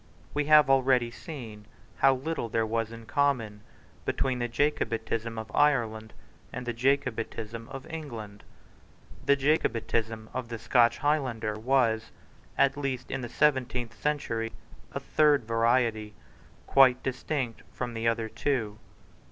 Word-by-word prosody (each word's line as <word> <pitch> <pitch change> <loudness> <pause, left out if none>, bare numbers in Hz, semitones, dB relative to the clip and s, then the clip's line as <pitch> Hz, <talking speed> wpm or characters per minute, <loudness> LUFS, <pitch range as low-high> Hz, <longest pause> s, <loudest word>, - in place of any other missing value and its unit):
We 150 0 0
have 150 -1 +7
already 130 -3 +3
seen 115 - -9 0.3
how 135 0 +5
little 135 -2 -3
there 115 0 +1
was 115 0 -1
in 115 0 -10
common 115 -7 0 0.4
between 130 -2 -1
the 120 - 0
Jacobitism 115 -4 -1
of 110 - -6
Ireland 110 -7 +2 0.4
and 125 - -6
the 120 - -2
Jacobitism 115 -3 -1
of 135 -1 -8
England. 115 -11 -7 0.8
The 140 - +6
Jacobitism 115 -6 0
of 125 -2 -4
the 115 - -4
Scotch 120 0 +3
Highlander 130 -8 0
was, 115 -1 +1 0.5
at 140 +1 +3
least 135 -3 -3
in 135 - -2
the 120 - -5
seventeenth 125 -5 +1
century, 115 -7 -2 0.4
a - - -3
third 150 -4 +3
variety, 115 -2 +1 0.5
quite 130 -2 +5
distinct 130 -2 -3
from 120 -1 -4
the 115 0 -1
other 115 -1 +1
two. 110 -4 -2
120 Hz, 130 wpm, -28 LUFS, 115-135 Hz, 0.8 s, have